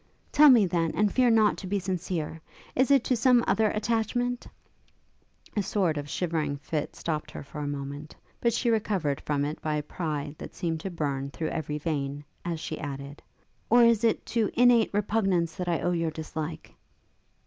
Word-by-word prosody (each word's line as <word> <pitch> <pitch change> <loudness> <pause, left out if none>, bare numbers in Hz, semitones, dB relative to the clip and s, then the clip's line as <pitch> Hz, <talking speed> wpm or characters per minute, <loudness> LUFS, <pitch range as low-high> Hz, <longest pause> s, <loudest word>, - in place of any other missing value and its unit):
'Tell 300 0 +8
me, 235 -6 +7
then, 170 -2 0
and 210 -1 +2
fear 255 -2 +4
not 220 -2 +4
to 190 - -7
be 200 +2 0
sincere. 180 -4 -3 0.3
Is 260 +2 +3
it 275 -3 +5
to 255 - +1
some 245 +1 +4
other 220 -1 +3
attachment 235 +3 -1 0.5
' - - -31
a 210 - +2
sort 185 -4 0
of 145 -1 -5
shivering 155 -5 -1
fit 150 +1 -4
stopt 155 -2 -3
her - - -8
for 150 +2 -9
a 145 - -3
moment, 145 +1 -6 0.2
but 235 - +2
she 235 +1 +1
recovered 195 -10 0
from 145 -1 0
it 150 +1 -5
by 155 -1 -1
a 150 - -1
pride 150 -2 -4
that - - -9
seemed 165 -3 -2
to 195 - -4
burn 140 -5 -2
through 155 +2 -3
every 150 -1 -3
vein, 145 -2 -3 0.2
as 170 -2 -3
she 155 0 -5
added, 140 0 -6 0.5
'or 240 +1 +6
is 230 -1 +4
it 225 -2 +2
to 225 -3 0
innate 245 -2 +5
repugnance 195 -5 +1
that 180 - -5
I 170 - 0
owe 175 - +1
your 165 -2 0
dislike?' 155 0 -6
170 Hz, 190 wpm, -27 LUFS, 150-220 Hz, 0.5 s, Tell